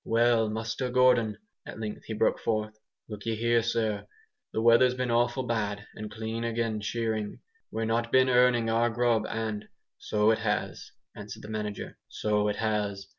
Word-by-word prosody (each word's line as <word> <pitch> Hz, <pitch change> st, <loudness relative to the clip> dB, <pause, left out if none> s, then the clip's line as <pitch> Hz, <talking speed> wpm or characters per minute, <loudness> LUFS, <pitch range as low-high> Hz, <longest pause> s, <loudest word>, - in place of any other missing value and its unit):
"Well, 115 Hz, -1 st, +3 dB
Muster 115 Hz, +3 st, -3 dB
Gordon," 125 Hz, -4 st, +3 dB, 0.3 s
at -, -, -9 dB
length 110 Hz, -1 st, -5 dB
he 110 Hz, -, -4 dB
broke 110 Hz, -, +2 dB
forth, 110 Hz, -1 st, -1 dB, 0.3 s
"look'ee 110 Hz, +1 st, -4 dB
here, 115 Hz, +1 st, +2 dB
sir. 110 Hz, -3 st, -1 dB, 0.4 s
The -, -, -2 dB
weather's 120 Hz, +2 st, +5 dB
been 125 Hz, -1 st, -1 dB
awful 120 Hz, +2 st, +2 dB
bad, 105 Hz, -3 st, -2 dB
and 110 Hz, 0 st, -7 dB
clean 110 Hz, +2 st, -4 dB
agin 115 Hz, -2 st, -1 dB
shearing. 110 Hz, -1 st, -2 dB, 0.3 s
We've 115 Hz, -, -2 dB
not 115 Hz, +1 st, 0 dB
been 130 Hz, 0 st, +5 dB
earning 125 Hz, -2 st, +4 dB
our 115 Hz, +1 st, +2 dB
grub, 115 Hz, -1 st, +1 dB
and 110 Hz, -2 st, -3 dB, 0.2 s
" -, -, -61 dB
"So 105 Hz, +1 st, +4 dB
it 110 Hz, -, +1 dB
has," 105 Hz, -1 st, -2 dB, 0.2 s
answered 105 Hz, 0 st, -9 dB
the 105 Hz, -, -9 dB
manager, 105 Hz, -1 st, -5 dB
"so 105 Hz, -1 st, 0 dB
it 105 Hz, -, 0 dB
has. 105 Hz, -3 st, -2 dB
110 Hz, 170 wpm, -28 LUFS, 105-115 Hz, 0.4 s, weather's